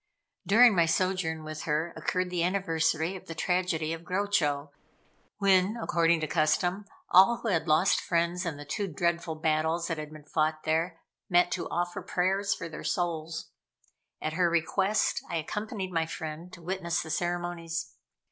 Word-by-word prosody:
During 230 +1 +7
my 170 -2 +4
sojourn 165 -2 0
with 155 0 -6
her 160 +2 -1
occurred 185 0 -1
the 175 -2 0
anniversary 170 -2 0
of 185 - -10
the 165 - -6
tragedy 165 -2 0
of 165 - -6
Grochow, 165 -7 0 0.7
when, 195 +1 +3
according 170 -4 +2
to 155 - -1
custom, 175 +6 +1 0.3
all 195 +6 +7
who 230 - 0
had 170 -3 0
lost 155 +5 +4
friends 170 +1 0
in 165 -5 -3
the 145 - -9
two 200 +8 -2
dreadful 170 -1 -1
battles 160 +2 0
that 165 -2 -2
had 150 0 -6
been 155 -1 -12
fought 155 +1 0
there, 165 +2 0 0.3
met 175 -1 +4
to - - -3
offer 175 +1 -2
prayers 195 +3 0
for 165 - -2
their 160 - -8
souls. 165 0 -2 0.7
At 155 - -3
her 175 +1 +2
request, 190 +5 +1
I - - -2
accompanied 200 +4 -3
my 165 -2 0
friend 160 +2 -6
to 170 - -11
witness 175 -1 -1
the 160 - -7
ceremonies. 175 -1 -2
170 Hz, 165 wpm, -29 LUFS, 160-185 Hz, 0.7 s, During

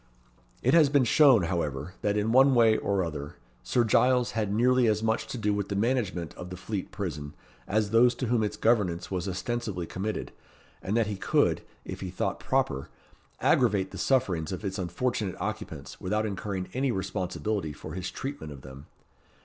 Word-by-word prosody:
It 130 - +3
has 160 -4 +6
been 140 -1 +4
shown, 130 - +6
however, 80 -2 -2
that, 105 0 +1
in 105 +2 +1
one 135 +2 +6
way 115 -2 +5
or 100 -3 0
other, 75 -3 -6 0.3
Sir 120 - +1
Giles 125 +2 +3
had 110 -4 -1
nearly 125 +3 +3
as 110 0 +1
much 110 0 0
to - - -5
do 105 -2 0
with 100 -1 -2
the 100 - -2
management 100 - -1
of 90 - -8
the 90 - -7
Fleet 100 0 -4
Prison 80 -8 -5 0.3
as 105 0 0
those 120 +2 +5
to 130 - -3
whom 120 -1 +1
its 105 - -2
governance 100 -8 +1
was 95 0 -2
ostensibly 100 -1 -3
committed, 100 +5 -4 0.5
and 105 +4 -1
that 115 - +3
he 105 -1 -4
could, - - +2 0.2
if - - -6
he 95 - -5
thought 90 - -2
proper, 70 0 -1 0.5
aggravate 105 -6 +3
the - - -7
sufferings 100 - +1
of 95 +2 -5
its 95 +1 -3
unfortunate 95 +2 -2
occupants - - -6
without 105 +4 0
incurring 100 -2 -3
any 130 +1 +1
responsibility 95 -2 -2
for - - -9
his 95 0 -4
treatment 135 - -6
of 70 -3 -10
them. 65 +1 -11
105 Hz, 180 wpm, -28 LUFS, 90-120 Hz, 0.5 s, has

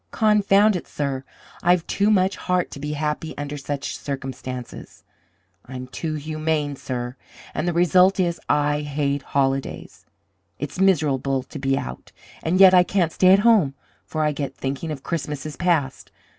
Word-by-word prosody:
Confound 210 -1 +4
it, 180 - -5
sir, 140 -2 -3 0.4
I've 175 -1 +3
too 200 +1 +1
much 190 -2 +3
heart 180 -1 -1
to - - -8
be 150 +1 -4
happy 150 +1 -3
under 145 0 -4
such 145 0 -4
circumstances! 130 -2 -7 0.6
I'm 130 0 -6
too 155 +5 -4
humane, 155 -1 -2
sir! 125 -2 -5 0.4
And 170 - -2
the 175 - +1
result 180 +3 +4
is, 175 -2 0
I 150 0 +2
hate 145 -1 -1
holidays. 135 -1 -2 0.5
It's 145 +5 -6
miserable 140 -8 +2
to - - -9
be 135 0 +1
out, - - -7 0.3
and 175 +3 0
yet 190 -1 +9
I 180 - +8
can't 180 -2 +1
stay 185 +2 +4
at 195 - +7
home, 195 -13 +4 0.3
for 155 -1 -2
I 150 - +2
get 140 -2 -4
thinking 135 +4 -4
of 145 -3 -5
Christmases 150 -2 -4
past. 160 -7 -1
150 Hz, 155 wpm, -23 LUFS, 140-180 Hz, 0.6 s, yet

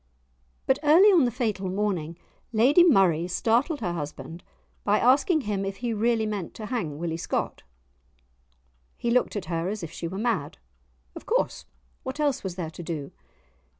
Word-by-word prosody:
But 265 - +2
early 325 +7 +6
on 345 -9 +5
the - - +2
fatal 215 -6 -2
morning, 180 -5 -2 0.3
Lady 255 +10 +5
Murray 185 - +4
startled 235 - +1
her 175 -5 -1
husband 160 +2 -7 0.4
by 205 +1 +3
asking 280 - +3
him 205 -5 -2
if 195 0 -3
he 240 0 -2
really 225 +1 +1
meant 205 -5 -4
to 215 - -7
hang 205 - -3
Willie 165 0 -3
Scott. - - -3 1.4
He 235 - -1
looked 250 -1 +2
at 205 - -3
her 165 +1 -2
as 210 -2 -4
if 165 - -6
she 170 - -5
were 185 +3 -6
mad; 230 +2 -1 0.6
of - - -10
course, - - 0 0.4
what 260 +2 -6
else 290 -4 0
was 185 -3 -4
there 170 -4 -4
to 170 - -9
do? 160 -5 -5
210 Hz, 170 wpm, -26 LUFS, 175-250 Hz, 1.4 s, early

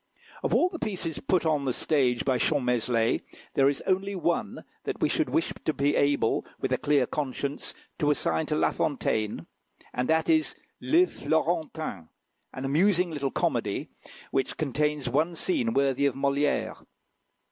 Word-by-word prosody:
Of - - +1
all 355 - +4
the 340 -3 -7
pieces 180 -6 -3
put 185 -3 +1
on 150 -3 +1
the 130 - +1
stage 130 -6 +1
by 130 -2 +2
Champmeslé, 125 -5 +1 0.3
there 135 0 +4
is 140 - -2
only 195 +1 0
one 170 -1 -1 0.2
that - - -4
we - - +3
should 320 - 0
wish 330 - 0
to 155 - +1
be 140 +1 +1
able, 140 -5 +2 0.2
with 130 - -1
a 130 - +1
clear 145 -3 +3
conscience, 140 0 -3 0.2
to 150 - +2
assign 80 - +1
to - - 0
La - - +2
Fontaine, 110 -1 -1 0.5
and 125 +3 -1
that 160 0 +2
is 315 -1 +2 0.3
"Le 345 +3 +4
Florentin," 160 - -2 0.4
an 130 - -6
amusing 175 +5 +3
little 140 -3 -2
comedy, - - -1 0.4
which 135 -1 -1
contains 150 -1 0
one 155 +7 +1
scene 265 - 0
worthy 140 - +2
of 135 - -2
Molière. 140 +1 0
145 Hz, 160 wpm, -27 LUFS, 135-170 Hz, 0.5 s, all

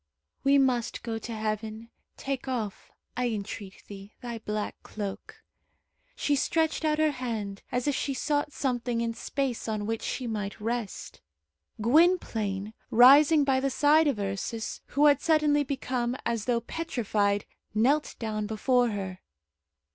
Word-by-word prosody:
"We 275 +1 +5
must 255 -4 +1
go 225 -1 -3
to 235 - -7
heaven. 215 +1 -4 0.3
Take 270 -1 -4
off, 225 -6 -4 0.3
I 250 +1 0
entreat 200 -2 -6
thee, 200 0 -11
Thy 240 -2 -6
black 210 -1 -4
cloak." 205 -2 -7 0.7
She 290 - +1
stretched 320 +3 +1
out 305 -1 +2
her 310 -1 +3
hand, 225 -7 -4
as 250 +2 -1
if 290 - +2
she 275 0 -2
sought 290 +3 0
something 245 -4 -1
in 230 0 -1
space 260 0 -3
on 215 -2 -2
which 225 +1 -2
she 255 - -3
might 210 -3 -4
rest. 230 -1 -4 0.6
Gwynplaine, 225 - +2 0.2
rising 285 +6 +7
by 270 -1 +2
the 275 +1 0
side 300 +4 +4
of 275 -6 +1
Ursus, 200 +3 -3
who 290 +1 +2
had 285 -2 +5
suddenly 300 -2 +3
become 255 -3 -2
as 230 -2 -1
though 240 -2 +1
petrified, 215 -9 -1 0.3
knelt 275 +8 +2
down 215 -2 -3
before 245 +3 +2
her. 190 -3 -4
240 Hz, 145 wpm, -28 LUFS, 215-275 Hz, 0.7 s, rising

